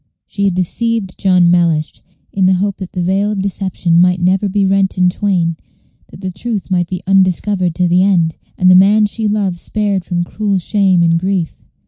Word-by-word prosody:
She 200 Hz, -, -3 dB
had 190 Hz, -3 st, 0 dB
deceived 200 Hz, +2 st, -2 dB
John 180 Hz, -3 st, +3 dB
Mellish, 165 Hz, -3 st, 0 dB, 0.3 s
in 190 Hz, -1 st, +2 dB
the 190 Hz, -, +3 dB
hope 200 Hz, +1 st, -2 dB
that 190 Hz, -1 st, -8 dB
the 180 Hz, -3 st, -2 dB
veil 195 Hz, +3 st, 0 dB
of 195 Hz, -2 st, -3 dB
deception 185 Hz, -3 st, 0 dB
might 180 Hz, 0 st, +2 dB
never 190 Hz, +3 st, +1 dB
be 200 Hz, 0 st, 0 dB
rent 195 Hz, 0 st, +1 dB
in 180 Hz, 0 st, +3 dB
twain, 175 Hz, -4 st, -1 dB, 0.5 s
that -, -, -14 dB
the 190 Hz, -1 st, -4 dB
truth 200 Hz, +1 st, -5 dB
might 175 Hz, -2 st, 0 dB
be 185 Hz, 0 st, -6 dB
undiscovered 185 Hz, -1 st, +1 dB
to 180 Hz, -, +1 dB
the 175 Hz, +1 st, +3 dB
end, 175 Hz, -5 st, +2 dB, 0.2 s
and 185 Hz, 0 st, +4 dB
the -, -, +7 dB
man 200 Hz, +3 st, +5 dB
she 215 Hz, +1 st, -3 dB
loved 200 Hz, -4 st, -1 dB
spared 205 Hz, -2 st, -2 dB
from 175 Hz, -1 st, -2 dB
cruel 200 Hz, +2 st, -2 dB
shame 185 Hz, -1 st, +1 dB
and 165 Hz, 0 st, +2 dB
grief. 185 Hz, -2 st, -3 dB
185 Hz, 195 wpm, -15 LUFS, 175-200 Hz, 0.5 s, the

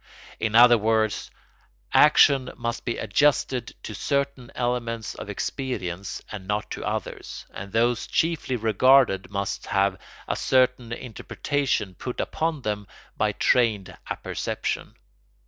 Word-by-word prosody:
In 110 Hz, -1 st, -1 dB
other 120 Hz, 0 st, +8 dB
words, 110 Hz, 0 st, +1 dB, 0.6 s
action 140 Hz, -3 st, +6 dB
must 120 Hz, 0 st, -3 dB
be 120 Hz, -, -2 dB
adjusted 125 Hz, +1 st, +1 dB
to 110 Hz, -, -6 dB
certain 140 Hz, +1 st, -2 dB
elements 120 Hz, -2 st, -2 dB
of -, -, -8 dB
experience 100 Hz, -9 st, -4 dB
and 100 Hz, -3 st, -7 dB
not 105 Hz, +1 st, -2 dB
to -, -, -5 dB
others, -, -, -5 dB
and 100 Hz, +1 st, -7 dB
those 120 Hz, +2 st, +1 dB
chiefly 160 Hz, -5 st, 0 dB
regarded 115 Hz, -2 st, +4 dB
must 100 Hz, 0 st, -3 dB
have 100 Hz, -1 st, +1 dB, 0.3 s
a -, -, 0 dB
certain 125 Hz, -2 st, +2 dB
interpretation 125 Hz, -2 st, -2 dB
put 125 Hz, +7 st, -6 dB
upon 160 Hz, -4 st, -2 dB
them 105 Hz, -2 st, -3 dB, 0.3 s
by 105 Hz, 0 st, +1 dB
trained 110 Hz, -4 st, +2 dB
apperception. -, -, -3 dB
115 Hz, 120 wpm, -25 LUFS, 105-130 Hz, 0.6 s, other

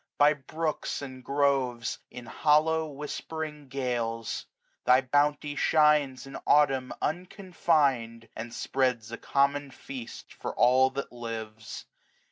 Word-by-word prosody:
By 145 Hz, +1 st, +6 dB
brooks 155 Hz, +1 st, -3 dB
and 130 Hz, -2 st, -8 dB
groves, 135 Hz, -4 st, 0 dB
in 125 Hz, -, -9 dB
hollow 155 Hz, +4 st, +2 dB
whispering 150 Hz, +1 st, -6 dB
gales. 120 Hz, -4 st, -2 dB, 0.4 s
Thy 125 Hz, +1 st, +6 dB
bounty 145 Hz, +2 st, +1 dB
shines 150 Hz, -5 st, +3 dB
in 135 Hz, -, -7 dB
Autumn 135 Hz, -3 st, +4 dB
unconfinM, 155 Hz, -, 0 dB
And 115 Hz, +1 st, -6 dB
spreads 125 Hz, -3 st, -1 dB
a 115 Hz, -, -5 dB
common 140 Hz, +1 st, +1 dB
feast 130 Hz, -2 st, -9 dB
for -, -, -6 dB
all 130 Hz, +2 st, +5 dB
that 135 Hz, +1 st, -5 dB
lives. 110 Hz, -2 st, -7 dB
135 Hz, 110 wpm, -28 LUFS, 125-150 Hz, 0.4 s, By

